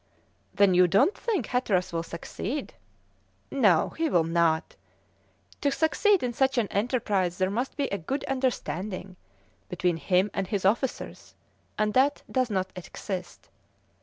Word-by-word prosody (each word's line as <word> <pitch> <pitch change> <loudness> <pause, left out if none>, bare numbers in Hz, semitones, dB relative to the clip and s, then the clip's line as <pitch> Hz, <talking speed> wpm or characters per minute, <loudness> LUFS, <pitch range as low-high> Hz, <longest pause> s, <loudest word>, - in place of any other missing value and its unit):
"Then 200 -2 +5
you 180 0 +6
don't 200 - +3
think 445 -6 -1
Hatteras 190 -8 0
will 165 - 0
succeed?" 195 - -5 0.8
"No, 205 - +3
he 325 -1 -1
will 175 - +3
not; 165 0 +1 0.9
to 285 - +2
succeed 370 +5 +2
in 245 -1 -1
such 265 +2 +1
an 230 -4 +2
enterprise 200 -5 0
there 185 0 +1
must 245 +7 -3
be 285 - +1
a 200 - -2
good 270 - -3
understanding 210 -8 -3 0.5
between 180 -1 0
him 180 +6 +1
and 195 - -2
his 200 -2 -2
officers, 235 +6 -1 0.4
and 215 0 +1
that 280 +3 +2
does 255 -2 +1
not 190 -2 -1
exist. 180 - -7
200 Hz, 140 wpm, -27 LUFS, 180-260 Hz, 0.9 s, you